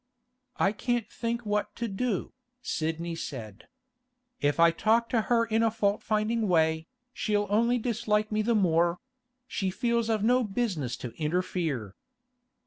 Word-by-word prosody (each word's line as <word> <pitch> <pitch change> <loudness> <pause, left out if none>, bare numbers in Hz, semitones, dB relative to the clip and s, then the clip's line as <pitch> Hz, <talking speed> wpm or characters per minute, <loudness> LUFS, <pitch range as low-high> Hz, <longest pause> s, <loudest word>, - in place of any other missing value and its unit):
'I 195 - +3
can't 240 +1 -1
think 235 0 -3
what 210 0 -1
to 235 - -2
do,' 205 -1 -2 0.3
Sidney 165 +1 -2
said. 115 -10 -7 0.7
'If 145 +2 +1
I 170 0 +7
talk 225 +7 +2
to 230 - +2
her 230 +1 +2
in 225 0 +1
a 225 - +4
fault 210 -2 0
finding 215 +1 0
way, 160 -2 +2 0.3
she'll 205 -3 0
only 235 +4 +3
dislike 220 -3 0
me 215 0 +1
the 230 +2 +1
more; 170 -3 +3 0.5
she 195 -6 -2
feels 235 +3 0
I've 215 -2 +1
no 250 +3 +4
business 195 - -2
to 120 - -5
interfere. 155 - -1
210 Hz, 145 wpm, -28 LUFS, 170-230 Hz, 0.7 s, I